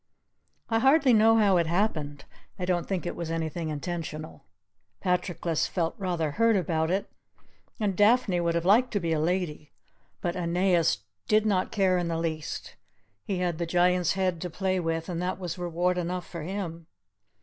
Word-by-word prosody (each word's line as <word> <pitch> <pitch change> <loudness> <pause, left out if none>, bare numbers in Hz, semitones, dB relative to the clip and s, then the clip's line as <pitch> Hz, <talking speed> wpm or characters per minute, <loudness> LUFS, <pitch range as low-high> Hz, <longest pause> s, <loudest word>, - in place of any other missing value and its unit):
I 225 -1 +1
hardly 270 +1 +5
know 225 +1 +6
how 200 -4 +4
it 170 -2 +2
happened 155 -6 -1 0.3
I 180 - -3
don't 180 -2 0
think 190 -3 -2
it - - -3
was 170 -2 -5
anything 165 0 -3
intentional. 155 0 -5 0.5
Patroclus 175 -3 0
felt 165 -3 -1
rather 175 -5 -1
hurt 230 +6 +3
about 160 -3 0
it, 190 +3 0 0.7
and 205 -3 0
Daphne 205 -2 +4
would 170 -1 0
have 170 0 -1
liked 230 +7 +5
to 205 - +1
be 165 -3 -1
a 155 - +1
lady, 160 -3 -2 0.5
but 175 0 -2
Aeneas 175 - +1 0.2
did 215 0 +3
not 190 -3 +1
care 190 -3 +2
in 175 - -1
the 165 -1 -1
least. 160 -2 -4 0.5
He 195 - -2
had 175 -2 -1
the 170 - -1
Giant's 180 0 +2
head 185 -3 -1
to 180 - -3
play 190 +2 -1
with 165 -1 -2
and 175 -1 -3
that 185 +1 -2
was 180 -2 -5
reward 175 +1 0
enough 180 +1 -3
for 170 - -7
him. 170 -2 -5
175 Hz, 175 wpm, -27 LUFS, 165-190 Hz, 0.7 s, know